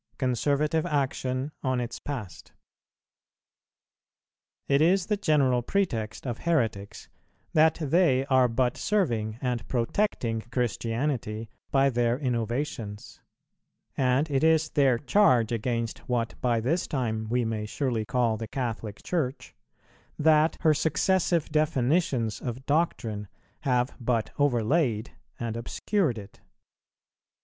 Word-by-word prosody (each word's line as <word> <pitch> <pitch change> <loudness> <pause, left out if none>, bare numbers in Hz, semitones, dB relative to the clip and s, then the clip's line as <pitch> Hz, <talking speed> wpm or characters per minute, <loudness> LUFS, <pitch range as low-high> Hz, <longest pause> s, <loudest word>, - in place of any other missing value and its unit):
CONSERVATIVE 145 +4 +1
ACTION 135 -2 -1
ON 130 -2 0
ITS 120 0 -4
PAST. 120 -11 -7 2.1
It 140 +1 +3
is 180 +3 +4
the 210 - +1
general 140 -10 +2
pretext 115 - -2
of 120 -3 -3
heretics 110 -11 -1 0.5
that 160 +1 +5
they 150 -4 +3
are 130 -2 +4
but 120 +1 0
serving 115 - 0
and 125 -2 -2
protecting 115 - 0
Christianity 115 -2 -2 0.2
by 135 0 +3
their 120 0 +1
innovations; 120 -4 -3 0.7
and 130 +3 +2
it 135 0 +1
is 160 -1 +4
their 135 -4 +3
charge 125 - +3
against 115 0 -2
what 120 -2 0
by 120 -2 +2
this 150 +10 0
time 110 -5 -2
we 120 0 +1
may 110 -1 -3
surely 120 -2 -1
call 115 -1 +1
the 115 0 -5
Catholic 115 -4 -4
Church, 150 -7 -2 0.6
that 155 +1 +4
her 155 -2 +5
successive 170 +1 +1
definitions 140 - +1
of 125 +2 -5
doctrine 120 -9 -1 0.3
have 125 -2 0
but 115 -2 -1
overlaid 125 -3 +1 0.3
and 115 -2 -3
obscured 135 - -1
it. 100 -1 -11
125 Hz, 115 wpm, -27 LUFS, 115-150 Hz, 2.1 s, that